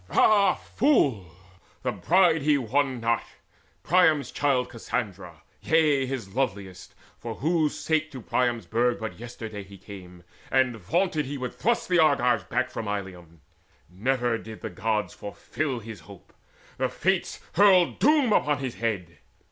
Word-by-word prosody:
Ah 200 Hz, -4 st, +4 dB
fool! 135 Hz, -, +1 dB, 0.5 s
the 125 Hz, -, 0 dB
bride 165 Hz, -, +3 dB
he 145 Hz, 0 st, +3 dB
won 130 Hz, +1 st, 0 dB
not, 115 Hz, 0 st, +1 dB, 0.6 s
Priam's 160 Hz, -4 st, +3 dB
child 135 Hz, -3 st, +1 dB
Cassandra, 100 Hz, -9 st, -5 dB, 0.2 s
yea, 150 Hz, -4 st, +2 dB
his 120 Hz, -8 st, -5 dB
loveliest, 100 Hz, -8 st, -4 dB, 0.2 s
for 115 Hz, -1 st, -6 dB
whose 160 Hz, 0 st, 0 dB
sake 160 Hz, -1 st, 0 dB
To 135 Hz, -, -8 dB
Priam's 120 Hz, -2 st, -1 dB
burg 120 Hz, +6 st, +1 dB
but 110 Hz, -1 st, -6 dB
yesterday 110 Hz, -3 st, -7 dB
he 100 Hz, 0 st, -13 dB
came, 90 Hz, -3 st, -12 dB, 0.3 s
And 130 Hz, -2 st, +2 dB
vaunted 150 Hz, -, -1 dB
he 145 Hz, +1 st, -4 dB
would 125 Hz, -1 st, -5 dB
thrust 235 Hz, +1 st, 0 dB
the 180 Hz, -1 st, +3 dB
Argives 125 Hz, -6 st, +3 dB
back -, -, -1 dB
From 110 Hz, -, -5 dB
Ilium. 90 Hz, -5 st, -6 dB, 0.5 s
Never 120 Hz, +4 st, 0 dB
did 110 Hz, -1 st, -10 dB
the 110 Hz, -, -5 dB
Gods 105 Hz, +3 st, -1 dB
fulfil 130 Hz, +6 st, -4 dB
His 110 Hz, 0 st, -9 dB
hope: 100 Hz, -3 st, -15 dB, 0.5 s
the -, -, +1 dB
Fates -, -, -1 dB
hurled 185 Hz, -2 st, +4 dB
doom 285 Hz, -6 st, +4 dB
upon 150 Hz, -5 st, +2 dB
his 130 Hz, -4 st, -4 dB
head. 95 Hz, -8 st, -3 dB
125 Hz, 145 wpm, -26 LUFS, 105-150 Hz, 0.6 s, Ah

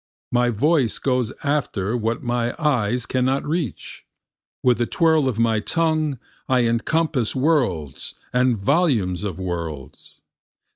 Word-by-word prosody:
My 120 Hz, 0 st, +3 dB
voice 130 Hz, +1 st, +1 dB
goes 125 Hz, -4 st, 0 dB
after 125 Hz, -8 st, -1 dB
what 115 Hz, +2 st, -2 dB
my 120 Hz, -1 st, -1 dB
eyes 125 Hz, -7 st, +1 dB
cannot 130 Hz, +1 st, 0 dB
reach, 155 Hz, -, -4 dB, 0.6 s
With 125 Hz, -2 st, +3 dB
the 120 Hz, -, +1 dB
twirl 160 Hz, -5 st, +3 dB
of 115 Hz, -, -4 dB
my 115 Hz, -1 st, +2 dB
tongue 155 Hz, +1 st, 0 dB, 0.3 s
I 130 Hz, -1 st, +4 dB
encompass 125 Hz, +2 st, 0 dB
worlds 125 Hz, -, 0 dB, 0.2 s
and 125 Hz, -1 st, +3 dB
volumes 105 Hz, -, +1 dB
of 100 Hz, -5 st, -3 dB
worlds. 85 Hz, -7 st, -6 dB
125 Hz, 125 wpm, -22 LUFS, 110-145 Hz, 0.6 s, I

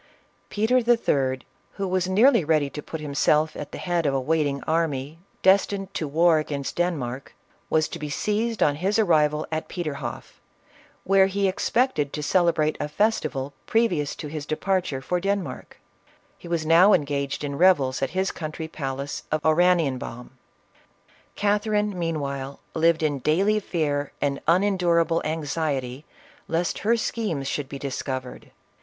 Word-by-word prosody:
Peter 220 Hz, +4 st, +2 dB
III., 140 Hz, -, +1 dB, 0.3 s
who 195 Hz, -1 st, -3 dB
was 185 Hz, 0 st, 0 dB
nearly 215 Hz, +2 st, +5 dB
ready 150 Hz, -2 st, +1 dB
to 150 Hz, -, -6 dB
put 160 Hz, -, -7 dB
himself 150 Hz, +1 st, +1 dB
at 145 Hz, -, -7 dB
the -, -, -7 dB
head 175 Hz, -3 st, -1 dB
of 135 Hz, -, +1 dB
a -, -, +2 dB
wait 155 Hz, +3 st, +1 dB
ing 140 Hz, -1 st, -4 dB
army, 155 Hz, -2 st, -1 dB, 0.2 s
destined 195 Hz, 0 st, +2 dB
to 160 Hz, -6 st, -2 dB
war 160 Hz, +2 st, +4 dB
against 145 Hz, -2 st, -4 dB
Denmark, 140 Hz, -7 st, -2 dB, 0.3 s
was 155 Hz, -1 st, +2 dB
to -, -, -7 dB
be 150 Hz, -, -5 dB
seized 215 Hz, +8 st, 0 dB
on 145 Hz, -1 st, +2 dB
his 195 Hz, +6 st, 0 dB
arrival 155 Hz, -7 st, +2 dB
at 155 Hz, 0 st, -3 dB
Peterhoff, 155 Hz, -6 st, -6 dB, 0.6 s
where 195 Hz, 0 st, +4 dB
he 195 Hz, 0 st, 0 dB
expected 190 Hz, -, 0 dB
to 150 Hz, -, -4 dB
celebrate 165 Hz, -2 st, +2 dB
a -, -, -2 dB
festival 150 Hz, -7 st, -1 dB
previous 180 Hz, -11 st, +1 dB
to 150 Hz, -, -7 dB
his 150 Hz, -1 st, -6 dB
departure 175 Hz, -4 st, -1 dB
for 180 Hz, +5 st, -1 dB
Den 200 Hz, +1 st, 0 dB
mark, -, -, -10 dB, 0.6 s
lie 170 Hz, -, -8 dB
was 165 Hz, -2 st, -1 dB
now 175 Hz, +6 st, +6 dB
engaged 140 Hz, -1 st, -1 dB
in 140 Hz, -1 st, -3 dB
revels 140 Hz, -6 st, +3 dB
at 135 Hz, -, 0 dB
his 190 Hz, +4 st, -1 dB
country 160 Hz, 0 st, -6 dB
palace 140 Hz, -2 st, -5 dB
of 155 Hz, -, +1 dB
Oranienbaum. 155 Hz, -7 st, +1 dB, 1.0 s
Catherine 210 Hz, 0 st, +1 dB
meanwhile 140 Hz, -5 st, -3 dB
lived 165 Hz, 0 st, +2 dB
in 145 Hz, -3 st, 0 dB
daily 195 Hz, +10 st, +2 dB
fear 145 Hz, -7 st, -2 dB
and 140 Hz, -1 st, -1 dB
unen 190 Hz, +4 st, +3 dB
d.urable 170 Hz, -2 st, +2 dB
anxiety 150 Hz, -4 st, -2 dB, 0.4 s
lest 170 Hz, +2 st, -1 dB
her 225 Hz, +3 st, +2 dB
schernes 205 Hz, -11 st, -2 dB
should 135 Hz, 0 st, -3 dB
be 140 Hz, -, -6 dB
discovered. 130 Hz, -2 st, -5 dB
160 Hz, 150 wpm, -24 LUFS, 145-185 Hz, 1.0 s, now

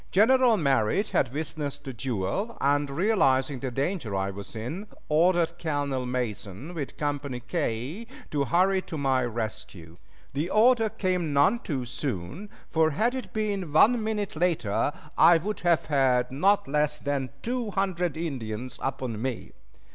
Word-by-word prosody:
General 240 Hz, +3 st, +5 dB
Merritt 140 Hz, -, +1 dB
had -, -, +1 dB
witnessed 145 Hz, -1 st, -4 dB
the 135 Hz, -, -5 dB
duel, 125 Hz, -, -2 dB
and 145 Hz, +1 st, +2 dB
realizing 140 Hz, -, +2 dB
the 130 Hz, -, -3 dB
danger 135 Hz, -, -2 dB
I 95 Hz, 0 st, -1 dB
was 100 Hz, +3 st, -9 dB
in, 150 Hz, -, -5 dB, 0.2 s
ordered 170 Hz, +2 st, +3 dB
Colonel 145 Hz, -5 st, -1 dB
Mason 125 Hz, -, -4 dB
with 150 Hz, -5 st, -5 dB
Company 145 Hz, -3 st, -2 dB
K 140 Hz, -, -3 dB, 0.2 s
to 145 Hz, -2 st, +1 dB
hurry 185 Hz, +5 st, +3 dB
to 160 Hz, -, -7 dB
my 135 Hz, -2 st, +2 dB
rescue. 110 Hz, -8 st, -5 dB, 0.4 s
The 150 Hz, +6 st, -1 dB
order 225 Hz, +1 st, +4 dB
came 180 Hz, -7 st, -1 dB
none 145 Hz, +12 st, +4 dB
too 140 Hz, -, -3 dB
soon, 130 Hz, -, -4 dB, 0.2 s
for 160 Hz, -1 st, +3 dB
had 220 Hz, -, +1 dB
it 260 Hz, -1 st, -5 dB
been 205 Hz, -6 st, -2 dB
one 220 Hz, +9 st, +5 dB
minute 210 Hz, -4 st, -2 dB
later 155 Hz, -, +1 dB, 0.3 s
I 165 Hz, +1 st, +8 dB
would 205 Hz, +6 st, -3 dB
have 175 Hz, -2 st, +2 dB
had 130 Hz, -4 st, +2 dB
not 195 Hz, +9 st, +2 dB
less 150 Hz, +1 st, +1 dB
than 140 Hz, -3 st, -2 dB
two 240 Hz, -1 st, -2 dB
hundred 180 Hz, -5 st, -1 dB
Indians 130 Hz, -7 st, -4 dB
upon 130 Hz, -5 st, -3 dB
me. 130 Hz, -2 st, -4 dB
145 Hz, 145 wpm, -27 LUFS, 130-185 Hz, 0.4 s, I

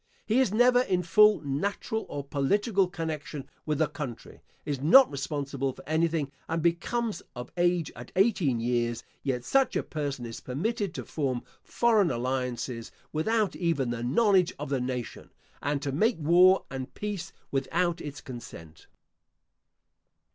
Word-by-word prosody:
He 225 Hz, +4 st, +2 dB
is 260 Hz, -7 st, +3 dB
never 245 Hz, +3 st, +5 dB
in 185 Hz, -7 st, 0 dB
full 210 Hz, +5 st, +5 dB
natural 200 Hz, +10 st, -2 dB
or 140 Hz, -, -4 dB
political 195 Hz, -, +1 dB
connection 160 Hz, -5 st, -5 dB, 0.2 s
with 150 Hz, -1 st, +1 dB
the 155 Hz, -, +3 dB
country, 145 Hz, -5 st, -7 dB, 0.2 s
is 140 Hz, -3 st, -3 dB
not 250 Hz, -, +7 dB
responsible 140 Hz, -1 st, -3 dB
for -, -, -15 dB
anything, 160 Hz, -2 st, +1 dB, 0.2 s
and 165 Hz, +1 st, 0 dB
becomes 210 Hz, +7 st, 0 dB
of 125 Hz, 0 st, -7 dB
age 175 Hz, -2 st, +1 dB
at 120 Hz, 0 st, -10 dB
eighteen 185 Hz, -, +2 dB
years; 120 Hz, 0 st, 0 dB, 0.2 s
yet 125 Hz, -3 st, -2 dB
such 270 Hz, -1 st, +2 dB
a -, -, +1 dB
person 140 Hz, -5 st, -4 dB
is 115 Hz, -1 st, -7 dB
permitted 195 Hz, -, -2 dB
to -, -, -5 dB
form 130 Hz, -5 st, -2 dB, 0.2 s
foreign 220 Hz, -6 st, +2 dB
alliances, 125 Hz, -1 st, -3 dB, 0.2 s
without 215 Hz, +6 st, +1 dB
even 155 Hz, -8 st, 0 dB
the 120 Hz, -1 st, -3 dB
knowledge 185 Hz, -, +3 dB
of 145 Hz, -1 st, -5 dB
the 135 Hz, -2 st, 0 dB
nation, 125 Hz, -1 st, -4 dB, 0.3 s
and 145 Hz, 0 st, -1 dB
to 140 Hz, -, -1 dB
make 220 Hz, -, +2 dB
war 180 Hz, +4 st, +5 dB
and 130 Hz, 0 st, -6 dB
peace 205 Hz, -4 st, -4 dB, 0.2 s
without 170 Hz, +5 st, 0 dB
its 145 Hz, -1 st, -7 dB
consent. 85 Hz, -, -10 dB
150 Hz, 145 wpm, -28 LUFS, 130-190 Hz, 0.3 s, not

